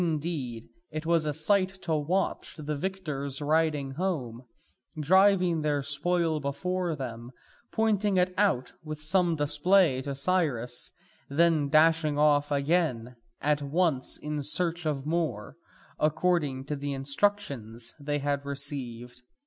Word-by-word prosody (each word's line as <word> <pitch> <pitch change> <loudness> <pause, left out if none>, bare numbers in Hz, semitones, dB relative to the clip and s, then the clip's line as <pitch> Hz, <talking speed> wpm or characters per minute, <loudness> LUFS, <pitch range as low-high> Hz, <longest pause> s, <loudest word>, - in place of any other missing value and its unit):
Indeed 150 -8 -3 0.2
it 155 +1 -5
was 165 -2 +2
a - - +1
sight 190 +5 +2
to 165 - -1
watch 165 +6 -1
the 150 -1 -3
victors 145 -6 -3
riding 150 -2 +1
home, 135 -8 -3 0.6
driving 180 +1 +4
their 145 -2 0
spoil 160 +2 0
before 170 +5 -2
them, 120 -3 -6 0.4
pointing 210 -3 +1
it 180 0 +2
out 195 -11 +1
with 155 -1 -6
some 170 +2 +2
display 150 0 +3
to 140 +1 -4
Cyrus, 140 -7 -1 0.4
and 140 - -7
then 160 -4 +3
dashing 155 -1 +4
off 145 -1 +3
again 140 -5 0 0.3
at 150 0 +1
once 145 -2 0
in 150 0 -4
search 170 +3 +1
of 140 -3 -2
more, 155 -9 -2 0.4
according 155 -4 +1
to 150 - -3
the 140 0 -4
instructions 135 - -1
they 145 0 -2
had 140 0 -1
received. 130 -4 -5
150 Hz, 130 wpm, -28 LUFS, 140-175 Hz, 0.6 s, driving